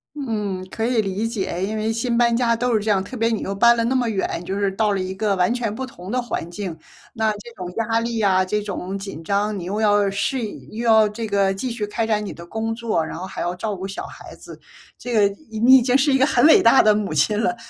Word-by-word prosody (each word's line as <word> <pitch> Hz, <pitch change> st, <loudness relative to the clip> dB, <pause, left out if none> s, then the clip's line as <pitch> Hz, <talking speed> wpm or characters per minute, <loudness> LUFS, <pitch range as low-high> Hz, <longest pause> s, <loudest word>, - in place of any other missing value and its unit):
嗯， 210 Hz, -9 st, -3 dB
可 225 Hz, -, -3 dB
以 240 Hz, -2 st, +2 dB
理 200 Hz, +1 st, -2 dB
解。 195 Hz, -5 st, -3 dB
因 215 Hz, +2 st, -3 dB
为 215 Hz, +1 st, -1 dB
新 235 Hz, +1 st, -1 dB
搬 235 Hz, -1 st, +3 dB
家 235 Hz, -1 st, +2 dB
都 240 Hz, +1 st, 0 dB
是 215 Hz, -, +1 dB
这 215 Hz, -, 0 dB
样， 195 Hz, -2 st, +2 dB
特 200 Hz, +7 st, -8 dB
别 230 Hz, -1 st, +1 dB
你 225 Hz, -, -1 dB
又 195 Hz, -, -3 dB
搬 235 Hz, +3 st, +5 dB
了 230 Hz, -, +1 dB
那 260 Hz, +2 st, 0 dB
么 245 Hz, -3 st, +1 dB
远， 195 Hz, -3 st, -1 dB
你 -, -, -10 dB
就 195 Hz, +2 st, -3 dB
是 200 Hz, -1 st, +1 dB
到 210 Hz, +1 st, +1 dB
了 195 Hz, -, 0 dB
一 185 Hz, +1 st, -4 dB
个 200 Hz, -1 st, 0 dB
完 180 Hz, +5 st, +2 dB
全 235 Hz, -4 st, -2 dB
不 260 Hz, +3 st, -4 dB
同 185 Hz, -5 st, -10 dB
的 250 Hz, 0 st, 0 dB
环 175 Hz, -8 st, -4 dB
境。 180 Hz, -3 st, -5 dB, 0.4 s
那 220 Hz, -2 st, +1 dB
这 210 Hz, +3 st, -8 dB
种 180 Hz, -1 st, -6 dB
压 225 Hz, 0 st, +1 dB
力 230 Hz, -1 st, -2 dB
啊， 190 Hz, -3 st, +3 dB
这 210 Hz, +3 st, -1 dB
种 195 Hz, -1 st, -5 dB
紧 195 Hz, -5 st, -8 dB
张， 205 Hz, +3 st, 0 dB
你 180 Hz, -, -6 dB
又 200 Hz, +5 st, -3 dB
要 205 Hz, -2 st, +3 dB
适 225 Hz, +4 st, -1 dB
应， 210 Hz, -, -10 dB
又 230 Hz, +3 st, -5 dB
要 220 Hz, -1 st, +5 dB
这 225 Hz, +2 st, -5 dB
个 200 Hz, -2 st, +1 dB
继 240 Hz, +6 st, -4 dB
续 215 Hz, -3 st, -3 dB
开 225 Hz, +2 st, -2 dB
展 210 Hz, -1 st, 0 dB
你 -, -, -6 dB
的 170 Hz, -, -11 dB
工 225 Hz, +4 st, -3 dB
作， 225 Hz, -9 st, -1 dB
然 -, -, -7 dB
后 185 Hz, -, -5 dB
还 -, -, -8 dB
要 175 Hz, +1 st, -2 dB
照 210 Hz, +3 st, -3 dB
顾 190 Hz, 0 st, -5 dB
小 195 Hz, -, -6 dB
孩 -, -, -11 dB
子。 -, -, -13 dB, 0.4 s
这 245 Hz, -, -6 dB
个 210 Hz, -3 st, +4 dB, 0.2 s
已 220 Hz, -1 st, -6 dB
你 260 Hz, +3 st, +8 dB
已 255 Hz, -, +3 dB
经 250 Hz, +2 st, +3 dB
是 280 Hz, +1 st, +2 dB
一 265 Hz, -, +4 dB
个 265 Hz, -, +4 dB
很 250 Hz, -1 st, +3 dB
伟 320 Hz, -, +7 dB
大 230 Hz, +3 st, +6 dB
的 215 Hz, 0 st, +5 dB
母 205 Hz, -5 st, -2 dB
亲 205 Hz, +8 st, +2 dB
了， 235 Hz, -, 0 dB
215 Hz, 300 characters per minute, -21 LUFS, 195-235 Hz, 0.4 s, 你